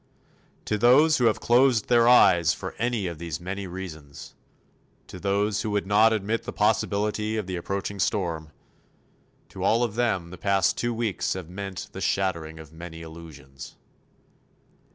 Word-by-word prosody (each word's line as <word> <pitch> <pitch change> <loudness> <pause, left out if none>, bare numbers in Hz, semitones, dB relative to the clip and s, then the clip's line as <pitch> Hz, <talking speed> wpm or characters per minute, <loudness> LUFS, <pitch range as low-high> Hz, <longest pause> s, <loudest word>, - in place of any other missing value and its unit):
To 105 - -1
those 145 +8 +5
who 125 - +2
have 110 - +2
closed 120 -2 +3
their 120 -1 +4
eyes 85 -9 +5
for 95 - -7
any 120 -4 -1
of 85 -3 -5
these 85 -3 -5
many 95 +2 -5
reasons, 80 -6 -9 0.7
to 90 - -10
those 100 +2 0
who 110 - -3
would 105 -1 -1
not 105 +3 +4
admit 110 +1 -1
the - - -4
possibility 105 +1 0
of 105 - -2
the 95 0 -4
approaching 100 +3 -4
storm 85 -6 -1 1.0
to - - -7
all 115 +2 +3
of 115 -4 -2
them 105 -8 -1
the 90 - -10
past 100 -1 +2
two 120 - -1
weeks 115 -4 -1
have 90 -3 -7
meant 95 0 -6
the 95 - -8
shattering 85 -3 -1
of 80 -1 -12
many 80 0 -9
illusions. 75 -5 -11
100 Hz, 160 wpm, -25 LUFS, 85-110 Hz, 1.0 s, those